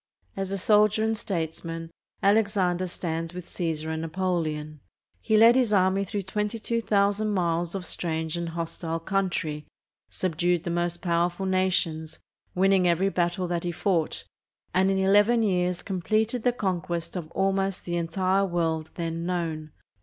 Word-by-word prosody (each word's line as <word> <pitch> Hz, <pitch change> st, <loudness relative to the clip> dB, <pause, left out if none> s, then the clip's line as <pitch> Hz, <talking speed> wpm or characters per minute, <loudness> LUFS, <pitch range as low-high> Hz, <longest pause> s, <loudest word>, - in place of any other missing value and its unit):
As 195 Hz, 0 st, -3 dB
a 195 Hz, -, -1 dB
soldier 210 Hz, +2 st, +4 dB
and 220 Hz, 0 st, +1 dB
statesman, 165 Hz, -4 st, -4 dB, 0.3 s
Alexander 200 Hz, -3 st, +2 dB
stands 165 Hz, -1 st, -4 dB
with 180 Hz, -1 st, -6 dB
Csesar 160 Hz, -3 st, -3 dB
and 160 Hz, -, -3 dB
Napoleon. 160 Hz, -3 st, -2 dB, 0.4 s
He 215 Hz, -, +2 dB
led 230 Hz, +2 st, +7 dB
his 250 Hz, -4 st, +2 dB
army 195 Hz, 0 st, +3 dB
through 200 Hz, 0 st, -3 dB
22,000 210 Hz, 0 st, 0 dB
miles 175 Hz, -3 st, 0 dB
of 190 Hz, -2 st, -4 dB
strange 160 Hz, -2 st, -3 dB
and 170 Hz, -1 st, -3 dB
hostile 165 Hz, 0 st, -4 dB
country, 165 Hz, -5 st, -2 dB, 0.4 s
subdued 175 Hz, -1 st, 0 dB
the 175 Hz, -, -3 dB
most 175 Hz, 0 st, -2 dB
powerful 175 Hz, +1 st, 0 dB
nations, 175 Hz, -4 st, 0 dB, 0.4 s
winning 190 Hz, 0 st, +4 dB
every 175 Hz, +3 st, +2 dB
battle 175 Hz, 0 st, 0 dB
that 175 Hz, -1 st, -1 dB
he 175 Hz, -, -1 dB
fought, 170 Hz, -2 st, 0 dB, 0.5 s
and 190 Hz, +2 st, +3 dB
in 195 Hz, -, +1 dB
eleven 205 Hz, +5 st, +4 dB
years 180 Hz, -3 st, 0 dB
completed 215 Hz, +5 st, 0 dB
the 245 Hz, -, +3 dB
conquest 180 Hz, -6 st, -3 dB
of 170 Hz, -4 st, -5 dB
almost 195 Hz, 0 st, 0 dB
the 175 Hz, -, -2 dB
entire 185 Hz, +3 st, +1 dB
world 165 Hz, -4 st, -1 dB
then 165 Hz, -1 st, -3 dB
known. 160 Hz, -4 st, -2 dB
180 Hz, 145 wpm, -26 LUFS, 165-195 Hz, 0.5 s, led